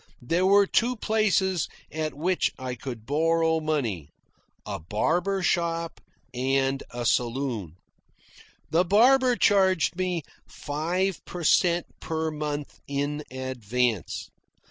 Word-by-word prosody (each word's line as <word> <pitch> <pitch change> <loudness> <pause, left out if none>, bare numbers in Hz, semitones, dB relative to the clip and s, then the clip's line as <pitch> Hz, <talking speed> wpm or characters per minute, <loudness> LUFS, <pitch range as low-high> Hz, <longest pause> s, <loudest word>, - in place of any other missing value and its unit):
There 170 +9 +1
were 200 +1 +6
two 240 +5 +1
places 200 - +1 0.2
at 155 0 -3
which 175 +5 +1
I 130 -1 -4
could 120 -2 -7
borrow 160 +3 +2
money; 120 - -2 0.6
a - - -4
barber 175 - 0
shop 170 -1 0 0.3
and 135 +2 +1
a 120 0 -5
saloon. 120 - -1 1.0
The 170 +3 +4
barber 250 +7 +5
charged 190 -6 +3
me 180 -3 -1 0.2
five 170 +4 -2
per 175 -1 -6
cent. 170 +2 +3
per 160 0 -2
month 150 -1 -4
in 145 +1 -2
advance. 125 -4 -2
160 Hz, 110 wpm, -26 LUFS, 130-185 Hz, 1.0 s, were